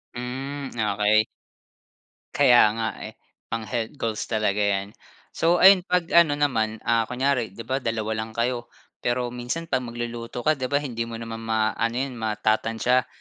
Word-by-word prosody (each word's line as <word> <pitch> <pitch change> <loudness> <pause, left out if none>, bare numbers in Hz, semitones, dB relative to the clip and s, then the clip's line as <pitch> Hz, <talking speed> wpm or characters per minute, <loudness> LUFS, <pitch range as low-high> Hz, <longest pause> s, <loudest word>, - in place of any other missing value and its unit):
Hmm, 135 +3 -5
okay. 105 0 +2 1.1
Kaya 120 -1 +6
nga 110 -1 -1 0.2
eh. - - -12 0.3
Pang-health 115 +2 -3
goals 115 -6 -2
talaga 105 -2 0
'yan. 100 -1 0 0.4
So 170 +1 +2
ayun 190 -1 +8
'pag 180 -2 +1
ano 170 -4 +5
naman, 110 -7 0
ah, 115 -1 +2
kunyari 125 -5 -1
'di 115 - -7
ba 130 +4 -1
2 115 -3 -2
lang 110 +1 -4
kayo? 120 0 -1 0.3
Pero 120 0 -1
minsan 125 +7 -4
'pag 130 - +2
magluluto 120 0 -5
ka 155 -1 +2
'di 130 -1 -2
ba 145 +2 +1
hindi 115 -4 -3
mo 115 - -6
naman 115 0 -6
maa-ano 110 +1 0
'yon 130 -1 -3
matatantsa. 115 +3 +1
120 Hz, 155 wpm, -24 LUFS, 110-130 Hz, 1.1 s, ayun